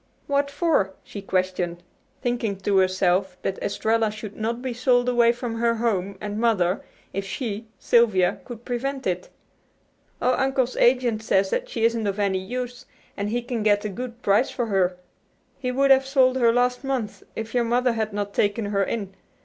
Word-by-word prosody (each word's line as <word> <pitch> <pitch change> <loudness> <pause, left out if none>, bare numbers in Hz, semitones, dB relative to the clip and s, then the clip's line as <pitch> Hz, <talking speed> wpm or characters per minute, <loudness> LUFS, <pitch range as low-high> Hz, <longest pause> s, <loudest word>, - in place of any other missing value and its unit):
"What 280 0 +1
for?" 280 - +1
she 200 - -8
questioned, 185 -2 -1 0.4
thinking 235 -4 -1
to 200 0 +2
herself 185 0 +1
that 190 - -2
Estralla 220 +2 +1
should 215 -1 -8
not 230 +2 -2
be 255 0 -3
sold 245 0 +2
away 240 -1 +4
from 235 -1 -4
her 235 0 +2
home 200 -4 -1
and 210 0 -4
mother 195 -6 +2 0.3
if 195 - -2
she, 220 +1 -4
Sylvia, 215 -7 +3
could 240 -2 -10
prevent 265 +2 -3
it. 180 -1 -2 0.9
"Oh, 255 - +2
Uncle's 265 -2 +1
agent 240 -3 +3
says 195 -3 +1
she 225 -1 -1
isn't 230 -2 +1
of 200 0 -1
any 200 -2 +1
use, 245 +5 -5 0.3
and 200 +1 -2
he 240 +2 -1
can 240 -2 -3
get 205 -1 +2
a - - -1
good 240 +3 -7
price 205 +6 +3
for 240 - -2
her. 185 -4 +1 0.6
He 250 -2 -2
would 275 +2 +3
have 265 0 +5
sold 260 -2 +4
her 235 -2 +4
last 245 +2 +1
month 260 -6 -3
if 225 0 -5
your 245 -1 +2
mother 245 +1 +2
had 220 -1 -2
not 205 0 -3
taken 205 +2 +1
her 200 -1 +1
in. 195 -1 -3
225 Hz, 180 wpm, -24 LUFS, 200-245 Hz, 0.9 s, have